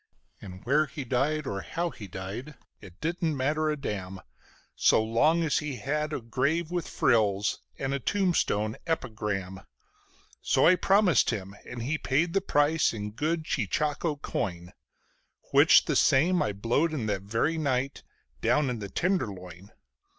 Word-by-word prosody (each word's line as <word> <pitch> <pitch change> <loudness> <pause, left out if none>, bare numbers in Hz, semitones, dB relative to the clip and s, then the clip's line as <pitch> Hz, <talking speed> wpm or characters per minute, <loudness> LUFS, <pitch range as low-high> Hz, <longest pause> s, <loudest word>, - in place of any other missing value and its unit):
And 95 -1 -10
where 150 +4 +3
he 140 +2 -6
died 140 +5 0
or 100 -6 -3
how 170 - -3
he 105 - -10
died, 100 +11 -7 0.2
it 90 0 -14
didn't 165 -2 -1
matter 155 +4 0
a 150 - -1
damn 95 -8 -5 0.6
So 110 - +4
long 150 +10 +2
as 155 - +1
he 150 -3 -4
had 150 +6 -2
a - - -2
grave 140 +9 -1
with 175 -2 -2
frills 105 -3 +1 0.2
and 135 0 -2
a 140 - -1
tombstone 130 - 0
"epigram". 105 - -3 0.8
So - - +2
I 185 - +7
promised 195 - +3
him, 100 -3 -4
and 120 -1 -6
he 150 +5 -1
paid 165 +6 0
the 195 - +2
price 150 -4 +2
in 105 -1 -5
good 155 +8 -1
cheechako 145 - -1
coin 90 -4 -4 0.8
(Which - - +6
the - - -1
same 175 +7 +4
I - - 0
blowed 120 +11 0
in 125 -7 -2
that 100 -3 -1
very 115 +11 -1
night 135 -2 -1 0.4
down 150 -4 +2
in 120 - -4
the 100 -1 -6
Tenderloin). 100 - -3
135 Hz, 155 wpm, -28 LUFS, 105-155 Hz, 0.8 s, I